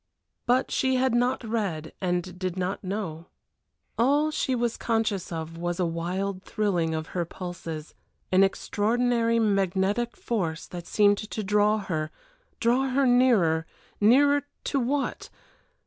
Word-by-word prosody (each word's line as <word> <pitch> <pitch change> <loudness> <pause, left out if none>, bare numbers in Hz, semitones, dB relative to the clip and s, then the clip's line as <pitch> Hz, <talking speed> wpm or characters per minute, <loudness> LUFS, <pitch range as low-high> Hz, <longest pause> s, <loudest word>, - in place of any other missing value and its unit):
But 250 +2 +2
she 260 0 +1
had 260 -1 +2
not 245 +2 +1
read, 200 -9 -3
and 180 0 -2
did 185 -1 -3
not 185 +3 -2
know. 185 -4 -4 0.7
All 290 +6 +3
she 265 -3 0
was 240 -1 0
conscious 220 -6 -1
of 165 0 -5
was 175 +1 -2
a 180 - +2
wild 180 +3 -2
thrilling 175 -7 0
of 155 0 -4
her 175 - -1
pulses, 165 -3 -7 0.4
an 185 +1 +6
extraordinary 230 +4 +1
magnetic 200 +2 +1
force 170 -9 -2
that 175 -1 -8
seemed 205 -1 +4
to 215 0 -5
draw 210 +2 +3
her 160 -7 -3 0.5
draw 250 +3 +2
her 270 +2 +2
nearer 225 -11 +4 0.3
nearer 285 +7 +5 0.2
to 275 - 0
what? 270 +3 -2
205 Hz, 135 wpm, -26 LUFS, 175-240 Hz, 0.7 s, an